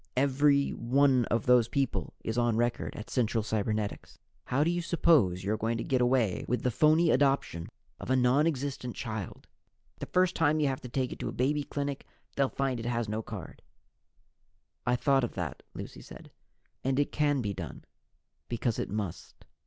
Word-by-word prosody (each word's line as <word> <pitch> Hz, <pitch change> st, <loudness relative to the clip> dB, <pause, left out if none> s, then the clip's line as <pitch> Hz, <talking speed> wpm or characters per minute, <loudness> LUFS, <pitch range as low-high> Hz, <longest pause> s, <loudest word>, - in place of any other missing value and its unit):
Every 140 Hz, +1 st, +3 dB
one 130 Hz, +1 st, +3 dB
of 115 Hz, +1 st, -1 dB
those 125 Hz, -2 st, +5 dB
people 135 Hz, +1 st, -2 dB
is 110 Hz, -, -2 dB
on 120 Hz, -2 st, +2 dB
record 120 Hz, 0 st, -1 dB
at 110 Hz, -, -8 dB
Central 115 Hz, -3 st, +1 dB
Cybernetics. 105 Hz, -1 st, -2 dB, 0.3 s
How 135 Hz, +4 st, +1 dB
do 165 Hz, -, +2 dB
you 175 Hz, 0 st, -1 dB
suppose 145 Hz, -, +3 dB
you're 105 Hz, +3 st, 0 dB
going 115 Hz, +2 st, -1 dB
to 115 Hz, -, -3 dB
get 130 Hz, -2 st, +1 dB
away 120 Hz, -5 st, +2 dB
with 125 Hz, -, -1 dB
the 125 Hz, -, +1 dB
phony 155 Hz, +6 st, +4 dB
adoption 135 Hz, -, +1 dB, 0.3 s
of -, -, -7 dB
a 130 Hz, -, +4 dB
non 130 Hz, +5 st, +4 dB
existent 135 Hz, -5 st, -3 dB
child? 110 Hz, -4 st, -5 dB, 0.5 s
The -, -, -5 dB
first 185 Hz, 0 st, +2 dB
time 155 Hz, -1 st, +2 dB
you 150 Hz, -, +2 dB
have 130 Hz, -, -3 dB
to 125 Hz, -, -8 dB
take 130 Hz, 0 st, -1 dB
it -, -, -7 dB
to -, -, -3 dB
a -, -, -6 dB
baby 145 Hz, +4 st, +1 dB
clinic, 140 Hz, -1 st, -4 dB, 0.3 s
they'll 135 Hz, -1 st, +2 dB
find 135 Hz, -3 st, -1 dB
it 115 Hz, -, -4 dB
has 120 Hz, -2 st, -1 dB
no 110 Hz, +1 st, -2 dB
card." 105 Hz, -6 st, -9 dB, 1.3 s
"I 125 Hz, -, +3 dB
thought 135 Hz, +1 st, +2 dB
of 120 Hz, -, -3 dB
that," 90 Hz, -5 st, -4 dB
Lucy -, -, -8 dB
said, -, -, -12 dB, 0.5 s
"and 130 Hz, 0 st, 0 dB
it 145 Hz, -, +1 dB
can 145 Hz, -3 st, +1 dB
be 100 Hz, -1 st, -2 dB
done, -, -, -8 dB, 0.6 s
because 120 Hz, -1 st, -1 dB
it -, -, -2 dB
must. 100 Hz, -4 st, -5 dB
125 Hz, 185 wpm, -29 LUFS, 115-140 Hz, 1.3 s, those